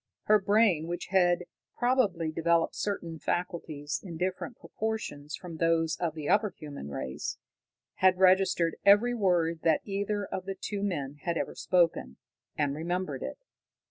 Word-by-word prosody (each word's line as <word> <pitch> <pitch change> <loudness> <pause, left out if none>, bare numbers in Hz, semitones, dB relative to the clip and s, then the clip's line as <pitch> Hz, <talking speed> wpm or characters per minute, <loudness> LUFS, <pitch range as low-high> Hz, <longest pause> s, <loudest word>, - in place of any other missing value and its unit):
Her 215 0 +5
brain, 200 -5 +3
which 175 +1 -4
had 180 -2 +3 0.3
probably 210 -11 +1
developed 165 +1 +2
certain 170 -6 -3
faculties 155 -5 -3
in 170 -5 -7
different 185 +6 -3
proportions 215 -10 -4
from 170 -3 -9
those 165 -1 +2
of 165 -3 -2
the 150 -2 -5
upper 205 +2 +3
human 140 - -8
race, 65 -2 -4 0.6
had 185 -1 +4
registered 185 -3 +4
every 205 +5 +6
word 175 -7 +1
that 160 -2 +3
either 205 0 -2
of 185 -1 -5
the 195 0 -4
two 205 -1 -3
men 145 -8 -2
had 170 -1 -1
ever - - -2
spoken, 170 - +1 0.4
and 145 -2 +1
remembered 175 +5 -3
it. - - -5
175 Hz, 145 wpm, -29 LUFS, 160-200 Hz, 0.6 s, every